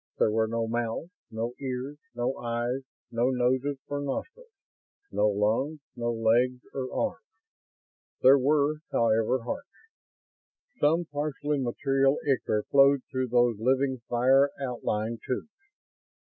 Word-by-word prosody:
There 110 - +3
were 110 +1 +2
no 115 0 -1
mouths, 120 +8 -2 0.2
no 115 +2 -3
ears, 135 +2 -4 0.2
no 120 +2 -1
eyes, 120 +2 -2 0.3
no 120 +2 +1
noses 130 +2 +1
or 145 - -3
nostrils, 370 - -5 0.6
no 105 - +2
lungs, 110 +9 0 0.2
no 120 0 -1
legs 120 +3 +2
or 130 -2 -4
arms. - - -2 1.0
There 135 +2 +8
were, 145 +2 +2
however, 115 +2 +2
hearts. 280 - -4 1.1
Some 165 +4 +3
partially 145 0 -2
material 135 +2 +1
ichor 115 -6 +1
flowed 140 -1 +5
through 130 0 -1
those 120 -2 +2
living 130 +2 +1
fire 130 +4 +4
outlined 115 -4 -2
tubes. 130 - -3
130 Hz, 120 wpm, -28 LUFS, 115-140 Hz, 1.1 s, There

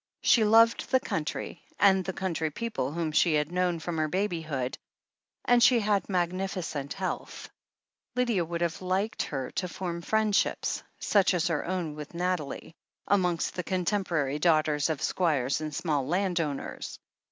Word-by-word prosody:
She 230 - +5
loved 225 +2 +5
the 260 - +4
country 160 -4 -4 0.2
and 190 -2 +5
the 190 - -3
country 170 -4 -2
people 215 - -3
whom 165 0 -2
she 155 +1 +3
had 150 +2 0
known 180 -1 +1
from 165 0 -4
her 155 - +1
baby 180 0 -1
hood, 135 -5 -3 0.7
and 245 0 +4
she 240 0 +6
had 205 -3 0
magnificent 175 -5 -2
health. 190 -1 -5 0.6
Lydia 240 -7 +1
would 170 +1 -4
have 170 +1 -1
liked 190 +4 -1
her 135 -3 -3
to 180 - -2
form 175 -1 -4
friendships 215 +2 +1
— - - -40
such 195 -2 +3
as 175 0 +1
her 155 -3 0
own 175 -4 -2
with 150 +2 -9
Nathalie 175 -4 -2 0.2
— - - -45
amongst 180 -3 0
the 180 - -3
contem 190 +2 0
porary 150 -5 -1
daughters 155 -3 +3
of 155 -3 -2
squires 150 -6 +1
and 155 -1 -3
small 145 -6 -1
landowners. 175 -4 -2
175 Hz, 165 wpm, -28 LUFS, 155-190 Hz, 0.7 s, she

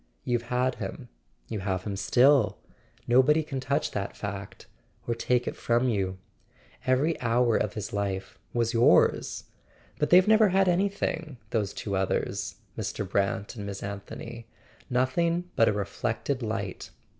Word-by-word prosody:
You've 120 -1 0
had 125 +1 +1
him; - - -6 0.4
you 110 - -4
have 95 -1 -2
him 100 -2 -3
still. 125 +4 +4 0.5
No¬ 125 +2 +6
body 150 +3 +3
can 140 -3 -4
touch 135 +2 -1
that 100 -1 -4
fact, 100 -1 -6 0.4
or 120 - +1
take 125 +1 0
it - - -2
from 120 +2 +1
you. 95 -4 -1 0.7
Every 140 +6 +2
hour 120 -1 +2
of 105 - 0
his 105 -1 -5
life 95 -2 -3
was 115 -1 0
yours. 115 +1 +3 0.6
But 150 - +1
they've 185 +2 +7
never 220 -1 +6
had 190 +1 +3
any¬ 190 +2 +2
thing, 160 -8 -3
those 105 -4 0
two 100 -2 -4
others, 95 0 -1 0.2
Mr. 105 -2 -3
Brant 100 +4 -1
and 100 -3 -6
Miss 100 -1 -6
Anthony; 105 +3 -7 0.4
nothing 170 +8 +1
but 115 - +5
a - - +3
reflected 110 +5 -2
light. 110 -4 -4
115 Hz, 155 wpm, -28 LUFS, 100-135 Hz, 0.7 s, they've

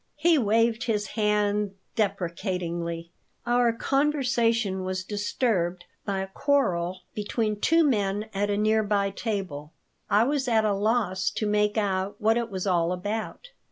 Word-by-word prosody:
He 325 +3 +3
waved 230 +1 +2
his 210 -3 -1
hand 210 -2 0 0.2
deprecatingly 175 -4 -2 0.3
Our 240 0 +3
conversation 235 -7 +1
was 185 0 -3
disturbed 200 -3 -1 0.2
by 195 -2 -1
a 190 - -4
quarrel 185 -11 +1
between 210 0 -2
two 330 +8 +4
men 205 -4 0
at 205 +1 0
a 205 - 0
near 215 +1 +3
by 200 -1 0
table. 185 -9 -4 0.4
I 210 +2 +4
was 275 +1 0
at 220 -2 +3
a 210 - +2
loss 200 -2 +1
to 215 - -3
make 210 0 +1
out 195 -2 0
what 220 +1 +3
it 235 -1 -1
was 190 -2 -4
all 175 -3 +2
about. 215 - -4
210 Hz, 145 wpm, -26 LUFS, 190-230 Hz, 0.4 s, two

